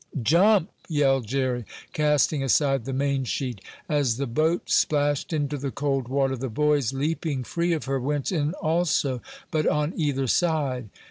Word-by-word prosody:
"Jump!" 185 - +4 0.2
yelled 135 -6 +2
Jerry, 130 -1 -1 0.3
casting 150 -1 +2
aside 135 -1 +2
the 135 - -3
mainsheet. 135 -4 -1 0.3
As 140 -6 +1
the 140 - -1
boat 155 +8 +1
splashed 145 0 +1
into 145 -2 -1
the 140 +1 -3
cold 135 -2 -1
water 135 0 +1
the 130 +1 -4
boys, 145 0 +1
leaping 145 0 -2
free 170 +7 -1
of 160 - -3
her, 135 0 -1
went 145 +4 -1
in 155 -1 0
also, 155 -7 0 0.3
but 155 -1 +1
on 150 +3 +1
either 140 -4 0
side. 135 - 0
140 Hz, 150 wpm, -25 LUFS, 130-155 Hz, 0.3 s, Jump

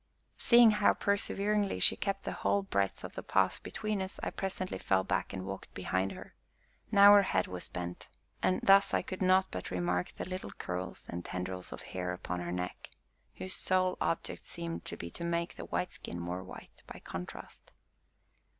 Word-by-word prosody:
Seeing 235 -2 +8
how 210 -1 +4
perseveringly 205 0 0
she - - +7
kept 195 -1 -2
the - - -3
whole 200 - +1
breadth 100 - -1
of - - -7
the - - -5
path 95 -1 +1
between 215 -2 -3
us, 190 0 -5
I - - -1
presently 190 -1 -3
fell 95 -1 +2
back - - -1
and 95 -1 -5
walked 95 0 -7
behind 95 +1 -1
her; - - -11 0.6
now 200 -1 +9
her 205 - +8
head 95 - +1
was 90 -1 -6
bent, 90 0 -6 0.3
and 185 - +2
thus 195 0 +6
I - - +1
could 185 - -6
not 185 0 +4
but 90 - -5
remark 90 0 -1
the - - -5
little 185 0 -5
curls 90 0 -5
and 85 0 -5
tendrils 90 +1 -5
of - - -7
hair 90 -1 -3
upon 90 0 -4
her 85 0 -4
neck, 90 0 -4 0.5
whose 185 - -5
sole 185 0 +1
object 165 - -1
seemed 170 -1 -6
to - - -5
be 85 - -6
to - - -5
make 170 0 -1
the - - -8
white 180 - -2
skin 85 - -6
more 90 +2 -4
white 95 - -12
by - - -9
contrast. 90 +1 -8
165 Hz, 185 wpm, -32 LUFS, -, 0.6 s, now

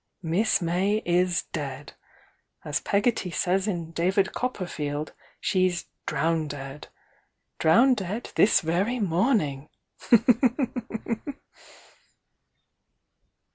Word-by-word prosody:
Miss 175 +4 +1
May 190 +6 +1
is 175 0 +2
dead! 140 -1 -5 0.7
As 150 +2 -1
Pegotty 205 -2 +1
says 190 +3 0
in 170 -5 -3
'David 190 +4 +1
Copperfield,' 155 - -3 0.3
she's 185 -2 +1 0.2
'drowndead.' 145 -2 -2 0.7
'Drowndead' 220 +3 +2
this 200 -1 +4
very 185 +9 0
morning!" 170 - +1
175 Hz, 70 wpm, -26 LUFS, 160-200 Hz, 0.7 s, this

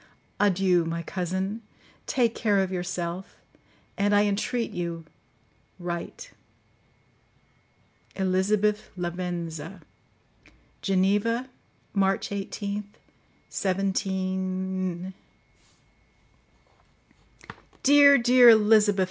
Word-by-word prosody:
Adieu! 190 -3 +3
my 165 +1 -4
cousin; 190 +5 -3 0.5
take 235 -3 +1
care 210 -4 +1
of 190 -1 0
yourself; 180 0 -4 0.6
and, 205 +1 +2
I 205 - +5
entreat 220 +4 -1
you, 170 -2 -5 0.7
write! 175 - -6 1.8
"Elizabeth 205 +3 0
Lavenza. 175 -1 -5 1.0
"Geneva, 205 +6 +1 0.4
March 195 -1 +1
18th, 200 +1 -4 0.7
17—." 190 -1 -2 2.7
"Dear, 285 0 +7
dear 245 0 +6
Elizabeth!" 210 -2 +5
195 Hz, 65 wpm, -26 LUFS, 180-210 Hz, 2.7 s, Dear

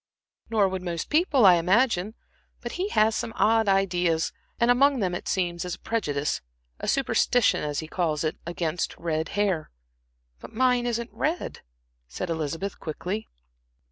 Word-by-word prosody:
"Nor 215 -3 +3
would 190 -1 -3
most 170 -2 -4
people, 300 - +4
I 180 -2 +8
imagine. 200 +3 +2 0.4
But 240 - -6
he 375 +4 -2
has 220 - +3
some 225 - -3
odd 225 -1 +3
ideas, 180 -4 +1 0.3
and 235 +1 +4
among 275 +2 +4
them, 185 -4 0
it 175 - -5
seems, 175 -2 -1
is 180 -1 -4
a - - -22
prejudice 150 -11 -1 0.4
a - - -5
superstition, 245 -3 +2
as 150 0 -2
he 160 - -8
calls 160 -3 -1
it 155 - -2
against 170 -1 -3
red 160 -1 -2
hair." 190 -6 0 0.7
"But - - -11
mine 250 0 +2
isn't 235 0 -3
red," 325 +4 -2 0.5
said 60 - -4
Elizabeth, 165 +5 -3
quickly. 180 +7 -4
190 Hz, 155 wpm, -26 LUFS, 165-230 Hz, 0.7 s, I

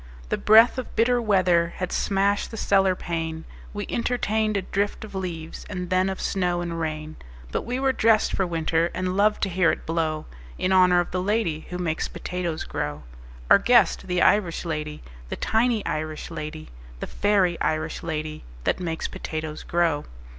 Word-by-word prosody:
The - - 0
breath 225 +4 +6
of 255 - -7
bitter 240 +2 +3
weather 180 -5 +2
Had 185 -1 -3
smashed 200 +1 +1
the 225 - -8
cellar 195 -3 +3
pane: 165 -2 -4 0.3
We 205 0 -4
entertained 220 -3 0
a 195 - -2
drift 200 +3 -2
of 215 - -13
leaves 170 -4 -5
And 180 -2 -5
then 185 +1 +3
of 190 - -4
snow 180 -2 0
and 170 -1 -4
rain. 155 -1 -4 0.3
But - - -2
we 250 +2 -1
were 270 0 +2
dressed 220 -3 +3
for 190 - +1
winter, 165 0 0
And 185 0 -1
loved 210 +2 +2
to 195 - +1
hear 180 -1 +3
it - - -5
blow 160 -2 -1 0.3
In 185 - 0
honor 180 -1 +5
of 175 - -6
the 185 - -1
lady 185 -6 -1
Who 180 - -4
makes 165 -3 -1
potatoes 175 -3 -4
grow 75 0 -4 0.4
Our - - +7
guest, - - +3
the 180 0 +1
Irish 185 -5 +2
lady, 150 -2 -4 0.3
The - - -3
tiny 225 -1 +1
Irish 155 +1 -4
lady, 155 -1 -6 0.3
The - - -3
fairy 195 -4 +1
Irish 155 0 -1
lady 155 -2 -4 0.2
That - - 0
makes 165 -3 -3
potatoes 155 -1 -5
grow. 165 -4 0
180 Hz, 175 wpm, -25 LUFS, 160-200 Hz, 0.4 s, Our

